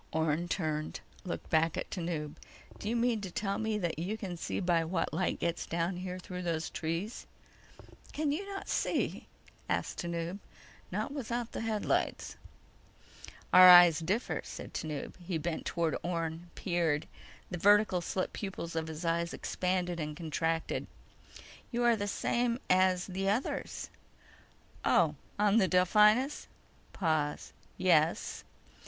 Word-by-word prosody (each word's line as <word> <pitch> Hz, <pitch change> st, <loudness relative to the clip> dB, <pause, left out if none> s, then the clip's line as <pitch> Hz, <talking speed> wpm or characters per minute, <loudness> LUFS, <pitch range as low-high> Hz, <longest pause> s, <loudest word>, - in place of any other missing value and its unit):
Orne 160 Hz, +2 st, 0 dB
turned, 155 Hz, -4 st, -2 dB, 0.3 s
looked 180 Hz, -, -5 dB
back 160 Hz, 0 st, +3 dB
at -, -, -4 dB
Tanub. 165 Hz, -4 st, -3 dB, 0.4 s
"Do 205 Hz, -, -3 dB
you 235 Hz, -, 0 dB
mean 235 Hz, -2 st, +1 dB
to 195 Hz, -, -5 dB
tell 195 Hz, +2 st, -2 dB
me 220 Hz, -1 st, 0 dB
that 175 Hz, -5 st, -2 dB
you 195 Hz, +6 st, -2 dB
can 190 Hz, -5 st, -5 dB
see 170 Hz, -, -3 dB
by 175 Hz, -3 st, +2 dB
what 165 Hz, +1 st, -1 dB
light 185 Hz, -, 0 dB
gets 170 Hz, 0 st, -2 dB
down 170 Hz, +2 st, -1 dB
here 180 Hz, 0 st, -5 dB
through 180 Hz, 0 st, -7 dB
those 165 Hz, -2 st, -2 dB
trees?" 165 Hz, +8 st, -3 dB, 0.8 s
"Can 300 Hz, -1 st, 0 dB
you 320 Hz, +7 st, -1 dB
not 390 Hz, -, -6 dB
see?" -, -, -1 dB, 0.4 s
asked -, -, -1 dB
Tanub. 170 Hz, +2 st, -3 dB, 0.5 s
"Not -, -, -2 dB
without 240 Hz, -4 st, -3 dB
the -, -, -4 dB
headlights." 220 Hz, -2 st, -1 dB, 1.2 s
"Our 185 Hz, 0 st, +11 dB
eyes 175 Hz, -3 st, +9 dB
differ," 195 Hz, +9 st, -1 dB
said -, -, -8 dB
Tanub. 150 Hz, -3 st, -4 dB
He 175 Hz, -1 st, -2 dB
bent 160 Hz, +1 st, -3 dB
toward 165 Hz, -2 st, 0 dB
Orne, 170 Hz, 0 st, -3 dB
peered. 170 Hz, -5 st, 0 dB, 0.5 s
The 175 Hz, -, -3 dB
vertical 205 Hz, -1 st, +5 dB
slit 185 Hz, +2 st, -2 dB
pupils 190 Hz, -5 st, -5 dB
of 160 Hz, -1 st, -1 dB
his 160 Hz, +2 st, -6 dB
eyes 170 Hz, +1 st, 0 dB
expanded, 180 Hz, -1 st, -1 dB, 0.2 s
contracted. 165 Hz, 0 st, -1 dB, 0.8 s
"You 240 Hz, 0 st, 0 dB
are 240 Hz, -1 st, +5 dB
the 205 Hz, -1 st, -3 dB
same 240 Hz, +3 st, 0 dB
as 185 Hz, -1 st, +4 dB
the... 195 Hz, +1 st, -2 dB
others." 225 Hz, +6 st, -2 dB, 0.9 s
"Oh, -, -, +4 dB, 0.2 s
on 205 Hz, +1 st, +4 dB
the 195 Hz, -4 st, +4 dB
Delphinus?" 210 Hz, +9 st, +4 dB, 0.4 s
Pause. 155 Hz, -4 st, -1 dB, 0.2 s
"Yes." 165 Hz, -3 st, +2 dB
180 Hz, 140 wpm, -31 LUFS, 165-205 Hz, 1.2 s, Our